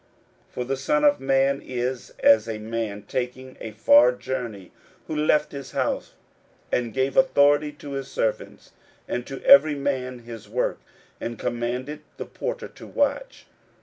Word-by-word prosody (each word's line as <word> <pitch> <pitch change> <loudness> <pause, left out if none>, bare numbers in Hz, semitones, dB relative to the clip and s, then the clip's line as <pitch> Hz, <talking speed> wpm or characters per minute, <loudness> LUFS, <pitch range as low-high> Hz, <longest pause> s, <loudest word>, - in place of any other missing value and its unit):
41:013:034 - - -34
For 125 - -3
the 135 +2 -2
Son 150 +3 +1
of 145 -1 +5
Man 135 +1 +2
is 125 0 -3
as 110 0 +5
a 110 - -3
man 110 -2 -4
taking 130 +3 -4
a 115 - -5
far 125 - +6
journey, 125 -7 -5 0.3
who 155 - -5
left 150 0 +2
his 140 -2 -8
house, - - -2 0.6
and 120 -2 0
gave 130 +3 -1
authority 145 - +4
to 145 -1 -10
his 135 -1 -4
servants, 110 - -3 0.4
and 125 - -3
to 135 - -7
every 145 +2 +7
man 130 -3 -3
his 115 -3 -10
work, - - -1 0.4
and 115 0 -5
commanded 125 +6 -3 0.2
the - - -5
porter - - -5
to - - -13
watch. - - -1
130 Hz, 155 wpm, -24 LUFS, 120-140 Hz, 0.6 s, every